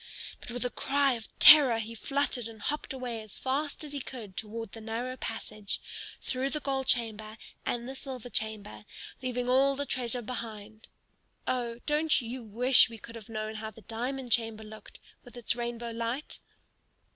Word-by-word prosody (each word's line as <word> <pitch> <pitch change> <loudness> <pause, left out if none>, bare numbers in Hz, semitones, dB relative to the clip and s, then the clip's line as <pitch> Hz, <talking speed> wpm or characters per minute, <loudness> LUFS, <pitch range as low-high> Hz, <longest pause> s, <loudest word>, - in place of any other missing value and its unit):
But - - -9
with 245 +1 -2
a 250 - 0
cry 280 -1 +2
of 230 -2 -5
terror 280 -7 +10
he 225 0 -4
fluttered 260 0 0
and 225 -1 -10
hopped 295 +8 -2
away 250 -4 -3
as 215 -2 -6
fast 285 +4 -1
as 295 -1 -6
he 285 - -2
could 230 -7 -7
toward 225 0 -4
the 225 - -9
narrow 235 +3 -3
passage, 215 -4 -4 0.4
through 260 +1 0
the 300 - -1
gold 270 -2 -1
chamber 220 -3 +1 0.3
and 240 0 -1
the 265 - -4
silver 255 -3 -7
chamber, 215 -1 -3 0.4
leaving 250 -1 -1
all 270 +2 +5
the 285 +1 -1
treasure 245 -2 -1
behind. 220 -2 -6 0.6
(Oh, 240 -2 -1
don't 305 +1 +4
you 245 +1 -5
wish 245 +5 +5
we 230 - -8
could 230 +2 -10
have 230 -2 -10
known 215 -1 -3
how 220 0 -4
the 220 +1 -14
diamond 245 +3 -3
chamber 225 -1 +2
looked, 215 0 -11 0.2
with 245 -1 -13
its 235 -1 +1
rainbow 235 -1 -3
light?) 230 +5 -3
235 Hz, 175 wpm, -30 LUFS, 220-260 Hz, 0.6 s, terror